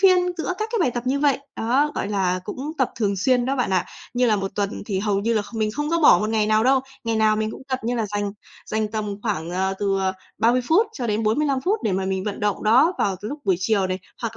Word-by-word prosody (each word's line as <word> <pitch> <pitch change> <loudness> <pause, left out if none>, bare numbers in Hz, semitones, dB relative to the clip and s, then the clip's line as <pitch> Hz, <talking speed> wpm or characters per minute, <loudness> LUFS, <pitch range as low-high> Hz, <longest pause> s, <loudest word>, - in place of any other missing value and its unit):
phiên 370 -2 +6 0.2
giữa 340 - -2
các 435 +1 -2
cái 460 - +1
bài 320 - +3
tập 240 +1 -5
như 275 +2 +1
vậy, 285 -3 +3 0.2
đó, 265 +7 +2
gọi - - -2
là, 185 -3 0
cũng 285 +9 -5
tập 260 - +2
thường 200 -3 0
xuyên 245 +5 +2
đó 270 +2 -1
bạn 250 - 0
ạ. 185 -2 +2 0.3
Như 250 0 +3
là 215 -3 +3
1 195 -1 -3
tuần 200 -1 -2
thì 195 -4 -1
hầu 200 -1 0
như 230 +3 0
là 215 - +1
kh 205 - -13
mình 215 -1 0
không 295 +7 -3
có 335 - +2
bỏ 300 - +7
một 215 +1 -1
ngày 215 -1 +2
nào 215 +1 +3
đâu, 265 +1 +4 0.2
ngày 225 -1 0
nào 215 -1 +3
mình 220 0 -1
cũng - - -9
tập, 260 0 -1
như 240 +2 0
là 225 -3 -1
dành 205 0 -2 0.3
dành 215 -1 -1
tầm 210 -2 -3
khoảng, 180 -7 -2
ờ, 190 +2 0
từ, 195 -1 +1
ờ, 190 0 0 0.3
30 235 +3 +3
phút 405 +8 +4
cho 245 - -4
đến 215 +1 0
45 265 +5 +1
phút 410 +9 +1
để 205 - 0
mà 190 0 0
mình 190 0 -2
vận 205 -1 -4
động 205 -1 0
đó 255 +11 +5
vào 195 -2 +1
t 200 - -16
lúc 285 +8 -4
buổi 185 -2 +3
chiều 195 0 +1
này, 185 0 -2 0.2
hoặc 230 -1 -3
220 Hz, 285 wpm, -23 LUFS, 200-260 Hz, 0.3 s, bỏ